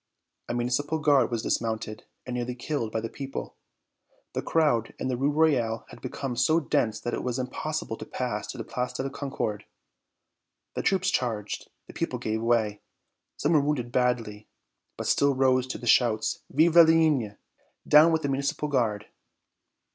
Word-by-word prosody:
A 120 - -1
Municipal 125 +6 0
Guard 145 -6 +3
was 115 -2 -2
dismounted 110 -1 -2 0.2
and 125 - -5
nearly 125 0 -3
killed 120 -3 -3
by 110 - -1
the 115 - -3
people. 135 +3 -6 0.8
The - - -1
crowd 145 -9 +1
in - - -3
the 125 - 0
Rue 135 +4 +1
Royale 140 -8 +1
had - - -13
become 135 -3 -4
so 140 +7 +3
dense 140 -8 0
that 120 - -4
it - - -2
was 125 0 -2
impossible 130 0 -3
to - - -8
pass - - -3
to - - -7
the - - -4
Place 125 0 -3
de 130 - -3
la 135 - -2
Concorde. 135 -7 -4 1.1
The - - -2
troops 190 -1 +1
charged. 110 -5 -2 0.2
The - - -13
people - - -2
gave 110 0 -2
way. 115 -3 +1 0.6
Some 150 +4 +1
were 150 - +5
wounded 140 -5 -1
badly; 115 -4 0 0.5
but - - -4
still 140 -1 +3
rose 130 -1 +3
the 125 - -6
shouts, 110 -2 +3
"Vive 160 +3 +3
la 170 - +11
Ligne! 155 -10 +3 0.5
Down 155 +3 +7
with 160 -1 +1
the 140 - 0
Municipal 140 +2 -1
Guard!" 110 -6 0
125 Hz, 170 wpm, -27 LUFS, 115-145 Hz, 1.1 s, la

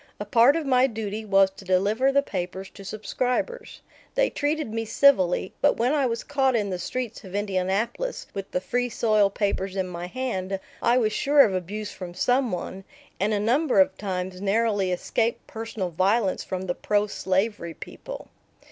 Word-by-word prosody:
A 210 - -4
part 235 +7 +5
of 325 -2 -1
my 260 -1 +4
duty 220 -2 -4
was 195 -2 +4
to 195 - -13
deliver 205 +8 +2
the 280 +1 +3
papers 190 -2 -5
to 200 - -12
subscribers. 250 - -3 0.3
They - - +2
treated 295 -5 -1
me 225 0 -1
civilly, 190 -7 +3
but - - +3
when 245 +5 +2
I 280 -4 +2
was 230 -1 -3
caught 270 -3 +1
in 205 -3 0
the 180 - -3
streets 245 +4 -4
of 190 -1 -9
Indianapolis 205 - -1
with 195 -1 -5
the 180 - -1
Free 245 +5 -1
Soil 215 -3 +3
papers 195 -1 -2
in 190 -1 -1
my 175 0 -6
hand 195 -5 -3 0.2
I 240 +1 +3
was 215 -3 +2
sure 285 +5 +5
of 205 - +4
abuse 205 +4 -4
from 180 -2 -8
some 250 +2 +2
one, 190 +2 -5 0.4
and 205 +3 +1
a 210 - +1
number 260 +8 +2
of 285 0 +4
times 185 -2 -4
narrowly 205 -2 +1
escaped 230 +6 -1
personal 220 -5 -5
violence 195 +4 +1
from 185 -1 -4
the 180 -1 -1
pro 205 +3 +1
slavery 190 -3 -1
people. - - -9
210 Hz, 180 wpm, -25 LUFS, 190-245 Hz, 0.4 s, part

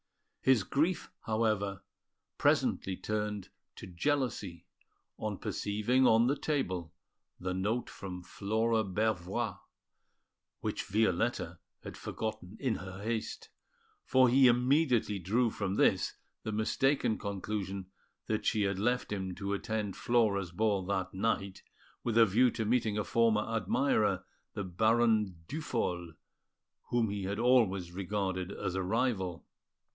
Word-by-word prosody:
His 130 -6 +4
grief, 160 - 0 0.2
however, 110 -3 0 0.6
presently 95 -1 +2
turned 105 -2 -3 0.3
to - - -9
jealousy, 100 - -2 0.5
on - - -3
perceiving 115 +6 +1
on 115 +1 +5
the 135 +3 +2
table 95 - -2 0.5
the 90 0 -2
note 105 +6 -1
from 90 -2 -7
Flora 110 +4 0
Bervoix, 105 +1 -1 1.0
which - - -2
Violetta 100 -3 0 0.2
had - - -7
forgotten 110 -3 -5
in 130 -6 0
her 95 +1 -8
haste, 110 0 -3 0.5
for 130 -1 +5
he 130 +2 +6
immediately 125 -3 +3
drew 110 +6 +1
from 100 -2 -2
this - - +2 0.3
the 110 - -4
mistaken 110 +3 +1
conclusion 100 -1 -4 0.3
that 110 -1 -1
she 110 -2 +2
had 100 -1 0
left 120 +3 0
him 95 -3 -3
to 100 0 -3
attend 105 -1 -2
Flora's 105 -7 +1
ball 100 +1 +1
that 95 -2 -1
night, 100 -1 -1 0.4
with 115 -1 0
a 115 - +8
view 115 +5 +4
to 110 -1 -3
meeting 110 -2 +1
a 105 - +1
former 115 -1 +2
admirer, 105 -3 +1 0.3
the 100 - -3
Baron 110 -1 +2
Duphol, 90 - -2 0.7
whom 115 -3 +1
he 100 -2 -3
had 100 +2 -2
always 110 -7 +3
regarded 95 0 -2
as 95 - -3
a 95 - -1
rival. 95 -3 -1
105 Hz, 125 wpm, -32 LUFS, 95-115 Hz, 1.0 s, a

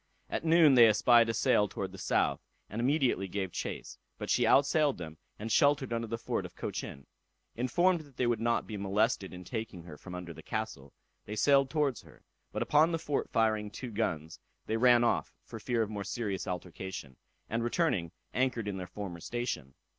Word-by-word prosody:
At - - -2
noon 160 -3 +6
they 120 -3 +8
espied 115 +2 +5
a - - +1
sail 115 -4 +3
towards 95 -1 -5
the 95 - -11
south, - - +1 0.3
and 110 +3 -3
immediately 130 -7 +1
gave 95 -1 -3
chase, - - -5 0.2
but - - -4
she - - +3
outsailed 145 +1 +4
them, 80 -2 -8 0.2
and 110 +2 -5
sheltered 140 -2 +3
under 115 0 -2
the 115 +1 -3
fort - - -2
of - - -10
Cochin. 70 - -5 0.5
Informed 175 +10 +2
that 145 -4 -18
they 125 - +1
would 120 -2 +1
not 115 +1 +1
be 110 - -6
molested 100 +1 0
in 90 0 -9
taking 110 -4 -5
her 80 -3 -10
from 90 -2 -8
under 90 -2 -6
the - - -11
castle, 110 - -5 0.3
they 105 - -5
sailed 135 +4 +4
towards 145 -5 0
her, - - -19 0.3
but - - -1
upon 155 +3 +4
the 165 - 0
fort 150 -3 -2
firing 110 -2 +1
two 115 +4 -7
guns, 80 -8 -2 0.3
they 110 - -1
ran 120 0 +5
off 120 - 0
for - - -9
fear 120 -2 0
of 105 - -5
more 100 -1 -4
serious 100 -3 -3
altercation, 90 -5 -6 0.3
and 115 +1 -1
returning, 120 - 0 0.2
anchored 125 -4 0
in 100 -2 -3
their 90 -1 -5
former 95 -4 -6
station. 110 - -4
115 Hz, 195 wpm, -31 LUFS, 95-130 Hz, 0.5 s, they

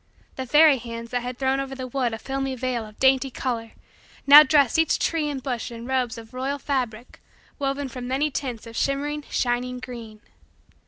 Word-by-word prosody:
The 260 -1 -5
fairy 295 0 +6
hands 230 0 -7
that 245 -1 -1
had 245 0 -5
thrown 265 0 +1
over 270 0 -4
the 260 -1 -5
wood 255 -1 -1
a 225 - -4
filmy 270 +3 -3
veil 245 -3 -2
of 215 - -16
dainty 265 0 +3
color 235 -3 -4 0.5
now 285 +2 +11
dressed 290 -1 +3
each 325 - +3
tree 315 -3 0
and 270 -3 -5
bush 245 -5 -3
in 230 0 -8
robes 250 -3 -1
of 225 +1 -12
royal 265 +3 -2
fabric 250 -5 -4 0.4
woven 275 0 -1
from 250 -1 -7
many 280 +4 0
tints 250 -5 -4
of 230 0 -10
shimmering, 290 +3 -1
shining, 250 0 -1
green. 230 -4 -9
260 Hz, 190 wpm, -24 LUFS, 240-275 Hz, 0.5 s, now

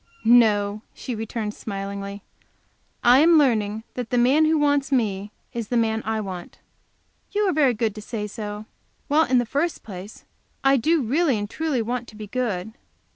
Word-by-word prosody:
"No," 215 -3 +4
she 250 - -5
returned 220 -1 -4
smilingly, 200 -1 -6 0.8
"I 245 +2 +7
am 330 +2 +6
learning 220 -6 +2
that 245 -2 -5
the 245 - 0
man 265 +6 +4
who 315 0 +3
wants 285 -1 +1
me 205 -6 0 0.2
is 235 -2 -4
the 245 - 0
man 225 -1 +1
I 220 0 -1
want." 185 -4 -7 0.8
"You 420 +1 +1
are 370 - +2
very 280 -5 +3
good 220 -1 0
to 215 - -8
say 210 0 -4
so. 210 0 -6 0.4
Well, 310 +3 +4
in 255 - +2
the 245 - +2
first 290 +8 -2
place, 195 0 -10 0.4
I 270 0 +5
do 310 +4 +2
really 275 +2 +2
and 205 0 -3
truly 285 0 -1
want 245 +1 -3
to - - -13
be 215 0 -7
good. 220 -3 -3
230 Hz, 180 wpm, -23 LUFS, 210-270 Hz, 0.8 s, I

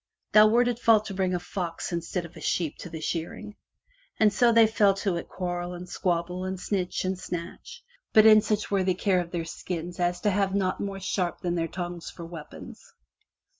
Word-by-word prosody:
Thou 215 0 +8
wert 240 +3 +4
at 240 -1 -1
fault 220 -3 +4
to 200 - -5
bring 185 -1 0
a - - -1
fox 175 -2 -4
instead 170 +1 -3
of 170 - -13
a - - -11
sheep 165 -5 -1
to 175 - -8
the 160 -1 -7
shearing!" 175 +7 -4 0.6
And 215 -2 +4
so 240 +3 +4
they 230 -1 +7
fell 210 -2 +3
to 195 -2 -1
at 170 - -6
quarrel 175 -1 -4
and 180 +1 -8
squabble 180 0 -2
and 185 0 -4
snitch 185 -1 -2
and 185 0 -2
snatch, 175 - -7 0.3
but 215 0 +6
in 215 -1 +8
such 210 -1 -1
worthy 190 -2 +2
care 190 -1 +2
of 175 -1 -3
their 170 -2 -3
skins 175 +1 -6
as 175 0 0
to 210 - +2
have 195 0 +1
naught 185 -2 0
more 195 -1 -4
sharp 185 -2 -2
than 175 -1 -1
their 165 -1 -1
tongues 175 0 -6
for 170 - -9
weapons. 165 -3 -10
185 Hz, 205 wpm, -27 LUFS, 175-205 Hz, 0.6 s, Thou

